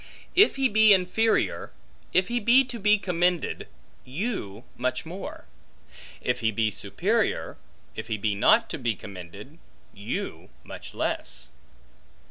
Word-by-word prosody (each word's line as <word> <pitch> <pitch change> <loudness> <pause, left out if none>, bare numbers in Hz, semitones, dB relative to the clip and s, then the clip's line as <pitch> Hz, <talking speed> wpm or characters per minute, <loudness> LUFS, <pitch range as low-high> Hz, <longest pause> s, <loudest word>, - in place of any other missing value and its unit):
If 405 +3 +5
he 270 -1 +3
be 220 -2 +6
inferior, 190 +5 +1 0.4
if 185 0 +3
he 240 +2 0
be 240 +4 +5
to 245 -2 -7
be 210 +1 +4
commended, 180 -2 0 0.4
you 130 - -4
much 130 +4 -2
more; 180 +4 -8 0.8
if 125 0 -1
he 115 -2 +1
be 110 0 0
superior, 100 -1 -1 0.4
if - - -6
he 110 -2 -2
be 105 0 0
not 100 - +4
to - - -4
be 115 -2 0
commended, 100 - -11 0.3
you 100 +1 -5
much - - -10
less. - - -3
165 Hz, 130 wpm, -26 LUFS, -, 0.8 s, be